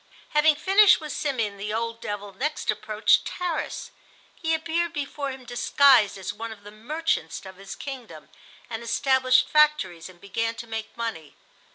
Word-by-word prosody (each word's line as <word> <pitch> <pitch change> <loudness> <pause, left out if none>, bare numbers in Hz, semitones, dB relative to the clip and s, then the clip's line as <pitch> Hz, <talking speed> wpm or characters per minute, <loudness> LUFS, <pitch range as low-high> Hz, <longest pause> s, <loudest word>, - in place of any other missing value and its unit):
Having 300 0 +4
finished 390 +6 +6
with 305 -2 -7
Simeon, 230 -10 -2
the 205 +1 -4
old 230 +1 -3
devil 205 -1 -5
next 295 +3 -1
approached 215 +1 +2
Tarras. 355 -3 -4 0.4
He 320 -1 -1
appeared 335 +2 -1
before 285 -1 -3
him 260 -1 -8
disguised 245 -2 +4
as 190 - -5
one 230 0 -6
of 210 -2 -12
the 205 - -11
merchants 225 - -2
of 190 -1 -10
his 195 0 -8
kingdom, 240 - -8 0.4
and 225 -1 -5
established 255 +2 +3
factories 300 - +2
and 180 -2 -16
began 225 +4 -2
to 235 - -7
make 225 -1 -6
money. 220 -10 -5
235 Hz, 160 wpm, -25 LUFS, 210-300 Hz, 0.4 s, finished